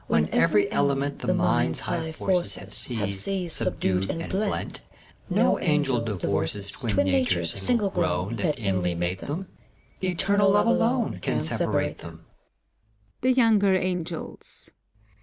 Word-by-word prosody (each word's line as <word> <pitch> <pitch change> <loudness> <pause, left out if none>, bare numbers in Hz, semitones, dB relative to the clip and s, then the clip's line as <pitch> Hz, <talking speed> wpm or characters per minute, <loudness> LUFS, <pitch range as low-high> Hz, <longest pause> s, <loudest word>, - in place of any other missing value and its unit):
When 75 0 +1
every 100 +5 +3
element 140 0 0
The - - 0
mind's - - +1
high 165 -2 -3
forces 180 +2 0
Have - - -10
seized, 125 - +1
subdued, 95 +1 0
and 165 0 -4
blent, 200 +2 -2 0.5
No - - +2
Angel 145 -6 +1
divorces 100 -1 -2
Twin 100 -5 +1
natures 85 -2 +1
single 225 -6 +3
grown. 95 - -1
That 145 +7 -1
inly 95 -4 -1
mate 90 +2 -2
them: 170 - -5 0.6
Eternal 195 +2 +2
Love, 205 +2 +3
alone> 235 - +1
Can - - -1
separate - - -1
them. - - -12
125 Hz, 115 wpm, -25 LUFS, -, 0.6 s, every